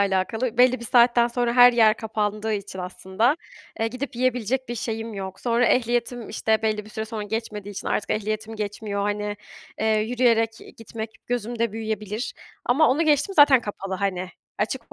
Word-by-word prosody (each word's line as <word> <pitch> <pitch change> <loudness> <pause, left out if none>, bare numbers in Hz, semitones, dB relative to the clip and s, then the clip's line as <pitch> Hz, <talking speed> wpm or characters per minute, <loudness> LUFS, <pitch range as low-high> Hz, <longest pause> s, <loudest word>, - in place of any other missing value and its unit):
alakalı 210 +5 0
belli 255 0 +5
bir - - -7
saatten 240 0 +5
sonra 240 0 0
her 245 0 +8
yer 220 -2 +5
kapandığı 215 0 -2
için 200 -2 -5
aslında, 190 +8 0 0.4
eee, 225 - +2
gidip 255 +1 -6
yiyebilecek 250 0 0
bir 240 - -3
şeyim 225 -1 -4
yok. 190 -1 -6
Sonra 240 0 +2
ehliyetim, 240 -1 0
işte, 220 0 0
belli 215 -1 0
bir 215 - -14
süre 220 0 -4
sonra 220 -1 -5
geçmediği 210 -1 -5
için 195 - -5
artık 210 - -1
ehliyetim 215 +1 -2
geçmiyor. 205 -1 -3
Hani, 205 0 -2 0.4
eee, 220 - +1
yürüyerek 230 0 +2 0.3
gitmek 225 0 -7 0.2
gözümde 235 -2 -2
büyüyebilir 215 0 -4 0.3
ama 280 +6 +4
onu 285 +6 +2
geçtim 300 +4 +2
zaten 285 -5 +7
kapalı, 195 -3 -5
hani. 185 -1 -2 0.3
Açık 230 +3 -3
225 Hz, 165 wpm, -24 LUFS, 210-245 Hz, 0.4 s, her